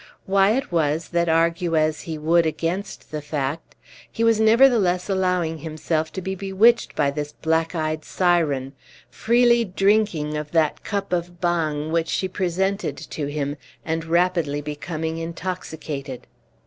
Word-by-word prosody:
Why 195 +4 +3
it 270 - -4
was 160 -1 0
that, 170 -1 +1
argue 165 +1 +2
as 155 0 +1
he 160 -2 -5
would 165 +2 +3
against 170 +5 -4
the 155 -1 -4
fact, 145 0 -4 0.4
he 230 - -2
was 230 -1 +4
nevertheless 220 -5 +4
allowing 180 -4 0
himself 155 0 -2
to 190 - -5
be 190 +1 -2
bewitched 195 +5 +2
by 140 -2 +2
this 145 0 -5
black 160 +1 0
eyed 155 -1 -2
siren 155 -7 +1 0.4
freely 235 +1 +3
drinking 195 -6 +1
of 150 0 -5
that 160 -3 +1
cup 200 -3 -3
of 175 0 -2
bang 160 -3 -1
which 165 0 +1
she 190 - -1
presented 190 -3 -1
to 145 -2 -5
him, 145 0 -3 0.3
and 160 0 -2
rapidly 170 -3 +1
becoming 155 +2 -4
intoxicated. 160 -6 -5
165 Hz, 145 wpm, -23 LUFS, 155-190 Hz, 0.4 s, was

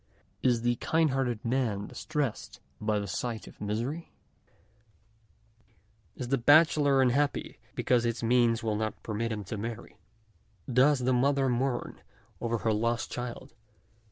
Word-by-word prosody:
Is 120 -3 +2
the 120 0 +1
kindhearted 135 -9 0
man 115 -5 0
distressed 150 -7 -4 0.2
by 105 0 +1
the 100 - -2
sight 115 +1 -4
of - - -15
misery? 120 +11 -3 2.0
is 125 - -5
the 135 -1 +2
bachelor 145 0 +5
unhappy 140 +3 0 0.2
because 125 -2 +2
his 115 0 -2
means 120 -1 +3
will 110 -2 0
not 110 -1 -3
permit 115 +2 -2
him 105 -2 -3
to 100 +3 -5
marry? 115 +1 -6 0.7
does 130 +2 +4
the 130 +1 +2
mother 135 +1 +2
mourn 125 +1 -2 0.4
over 115 0 -1
her 110 0 0
lost 115 +2 -1
child 125 -1 -6
120 Hz, 130 wpm, -29 LUFS, 115-135 Hz, 2.0 s, bachelor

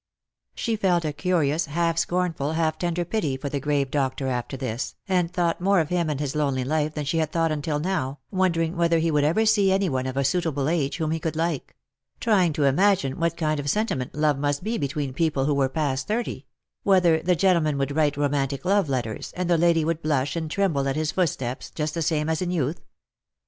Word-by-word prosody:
She 230 - -1
felt 180 -5 +1
a 150 - -1
curious, 160 -2 0
half 165 +2 0
scornful, 165 -5 -1
half 160 -1 0
tender 175 0 -1
pity 165 -8 -1
for 140 +1 -4
the 140 - -2
grave 140 -1 0
doctor 135 -1 -1
after 125 +2 -3
this, 125 -2 -4
and 180 -3 +1
thought 175 -2 0
more 195 +1 +3
of 160 -2 0
him 175 -3 0
and 145 -3 -2
his 145 -1 -3
lonely 140 -4 0
life 150 +3 -1
than 150 -2 -3
she 160 +4 0
had 155 -1 -1
thought 165 -1 +1
until 150 0 -1
now, 150 -6 -2
wondering 175 -3 +1
whether 170 -1 +2
he 165 0 +1
would 150 -1 +2
ever 170 +10 +2
see 205 -3 +4
any 190 -1 +2
one 130 -2 -1
of 130 +1 -4
a 140 - +2
suitable 145 -1 0
age, 155 -4 0
whom 160 -2 -1
he 165 - -1
could 160 0 -3
like; 165 -2 -2 0.4
trying 195 -7 +3
to 145 - 0
imagine 145 -1 +2
what 170 0 0
kind 155 -2 0
of 145 0 -2
sentiment 140 - -1
love 150 -2 +1
must 145 0 -1
be 225 +2 -1
between 140 -2 -2
people 150 -2 0
who 145 - +2
were 135 -1 +2
past 135 -2 -1
thirty; 235 +3 -3 0.3
whether 180 -5 +4
the 180 +2 +2
gentleman 170 -5 +2
would 140 +1 -1
write 150 -2 +2
romantic 140 0 -1
love 195 -4 +2
letters, 120 -5 -3
and 180 -1 -1
the - - +5
lady 165 -2 +3
would 165 0 -1
blush 145 -2 0
and 160 -2 -3
tremble 160 -7 0
at 135 - 0
his 155 0 0
footsteps 135 -9 -2
just 150 -1 -3
the 165 - -2
same 155 -1 0
as 160 +1 0
in 180 - -1
youth. 160 -3 -1
155 Hz, 220 wpm, -25 LUFS, 140-175 Hz, 0.4 s, the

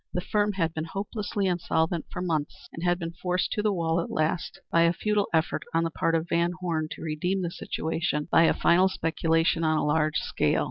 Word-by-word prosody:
The - - 0
firm 205 +3 0
had 165 -4 0
been 160 0 -3
hopelessly 200 +2 -3
insolvent 170 -2 0
for 180 - -4
months, 155 -4 -3
and 165 - -7
had 175 0 +2
been 165 -2 -4
forced 180 +1 -1
to 210 - 0
the 210 0 +2
wall 165 -3 0
at - - -5
last 170 +3 -1
by 170 - +4
a 170 0 +4
futile 210 +2 0
effort 160 -1 +1
on 165 - +3
the 165 - -1
part 165 +1 0
of 165 +1 -1
Van 170 0 +1
Horne 165 -4 -1
to - - -10
redeem 180 +5 -1
the 170 - -2
situation 160 -3 -2
by 165 - +6
a - - +4
final 185 +3 +4
speculation 165 -1 +1
on 155 -1 +2
a - - 0
large 150 0 +2
scale. - - +1
170 Hz, 220 wpm, -27 LUFS, 160-180 Hz, -, by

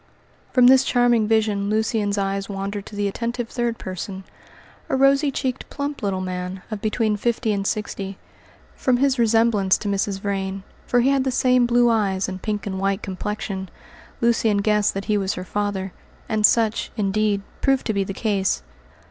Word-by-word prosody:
From 250 -2 +5
this 260 +1 +7
charming 240 -3 +3
vision 210 -2 +1
Lucian's 215 -1 0
eyes 195 0 -2
wandered 200 0 -4
to 210 - -10
the 205 0 0
attentive 235 +3 -3
third 240 -2 -2
person, 190 +1 -6 0.7
a - - +1
rosy 275 +2 +4
cheeked, 260 -1 -3
plump 285 0 -4
little 195 -2 -1
man, 185 0 -5
of 210 -2 -4
between 215 0 0
fifty 230 0 0
and 200 -1 -1
sixty. 200 -2 -3 0.6
From 255 -2 +1
his 270 0 +2
resemblance 225 -4 +3
to - - -6
Mrs. 200 0 -1
Vrain 195 -1 -3 0.2
for 245 - +3
he 265 +3 +3
had 275 -1 +2
the 265 - 0
same 250 -1 +3
blue 240 0 +4
eyes 200 -5 +1
and 190 -1 -6
pink 210 -1 -3
and 190 -2 -3
white 195 +1 0
complexion 190 0 -4 0.5
Lucian 230 -3 +2
guessed 210 0 +2
that 195 - -3
he 210 -1 +1
was 190 -1 -1
her 180 - -6
father, 200 -2 -2 0.3
and 215 -1 +4
such, 225 -2 +1
indeed, 205 0 +1 0.2
proved 270 -1 +2
to 220 - 0
be 200 -1 +1
the 195 - -5
case. 195 - 0
210 Hz, 175 wpm, -22 LUFS, 195-235 Hz, 0.7 s, this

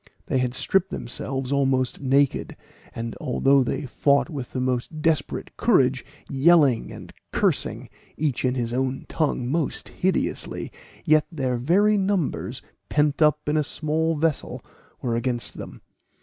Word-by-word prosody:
They 130 - 0
had 125 -1 -1
stripped 190 +6 +1
themselves 135 +2 -3
almost 135 -2 +1
naked; 140 +1 +1 0.4
and 115 0 -4
although 135 +2 +3
they 125 - -3
fought 140 +5 +2
with 135 -5 -6
the 130 - -3
most 130 +4 -2
desperate 160 -2 -1
courage, 135 - +3 0.2
yelling 140 -3 +4
and - - -10 0.2
cursing, - - 0 0.3
each 145 -5 -1
in 130 0 +1
his 120 -2 -2
own 130 +1 -1
tongue, 145 -6 -1
most 155 +2 -2
hideously, 185 0 -2 0.3
yet 155 0 +4
their 130 -6 -1
very 200 - +3
numbers, 190 -6 -1 0.3
pent 150 0 +1
up 150 -1 +3
in 150 - +1
a 150 - +2
small 160 +2 -1
vessel, 155 -1 -1 0.4
were 120 -2 0
against 120 0 -3
them. - - -9
140 Hz, 140 wpm, -24 LUFS, 130-155 Hz, 0.4 s, yelling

